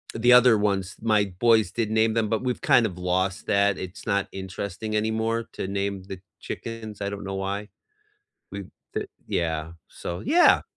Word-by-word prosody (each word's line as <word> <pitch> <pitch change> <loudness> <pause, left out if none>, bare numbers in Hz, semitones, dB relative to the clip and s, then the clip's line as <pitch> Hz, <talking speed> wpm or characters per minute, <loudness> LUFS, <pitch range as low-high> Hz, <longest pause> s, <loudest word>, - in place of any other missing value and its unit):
the 120 +2 +5
other 125 -2 +7
ones, 100 -2 0
my 110 -2 +3
boys 115 -5 +4
did 115 -2 -1
name 110 0 +3
them, 115 -2 +2
but 110 +2 0
we've 125 -1 -1
kind 120 -2 +5
of 90 -4 -9
lost 95 +1 0
that, 100 -1 +3
it's 95 +2 -8
not 100 0 +1
interesting 95 +3 -5
anymore 110 +1 0
to 95 - -4
name 100 0 -2
the 95 -2 -7 0.2
chickens, 110 -3 -7
I 100 - -1
don't 100 0 -6
know 95 0 -4
why. 100 +2 -3 0.8
We 100 0 -5 0.3
the - - -2 0.2
Yeah, 80 -1 -1 0.2
so 85 - -6
yeah. 340 +5 +5
100 Hz, 175 wpm, -25 LUFS, 95-110 Hz, 0.8 s, other